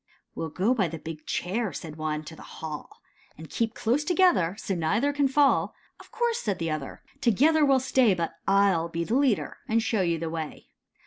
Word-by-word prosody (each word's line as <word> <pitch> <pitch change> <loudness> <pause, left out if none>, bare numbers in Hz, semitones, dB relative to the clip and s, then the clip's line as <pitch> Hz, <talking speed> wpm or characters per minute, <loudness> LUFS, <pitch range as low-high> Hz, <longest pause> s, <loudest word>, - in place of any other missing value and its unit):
"We - - -6
'11 160 - -9
go 205 +7 +3
by 205 -8 +1
the 165 0 -6
big 155 0 -9
chair," 205 +3 -1
said 155 +1 -7
one, 155 -1 -3
"to 160 - -10
the - - -13
hall, 155 -2 -8 0.3
And 160 0 -11
keep 225 -2 -1
close 250 +7 +1
together, 345 - +3
so 200 - -3
neither 210 - +1
can 285 -1 +2
fall." 275 +1 +2 0.2
"Of - - -15
course," 470 0 0
said 205 -5 -2
the 165 -2 -2
other, 150 -3 -5 0.2
"together 300 - +4
we'll 275 -2 +4
stay, 250 -6 +3
But 170 -2 -2 0.2
I 200 0 +5
'11 170 -1 -1
be 170 0 -1
the 215 - -3
leader, 265 -6 +1
and 225 +1 +2
show 225 -3 0
you 170 -2 +1
the 165 0 -4
way. 160 -2 -6
195 Hz, 210 wpm, -27 LUFS, 165-260 Hz, 0.3 s, I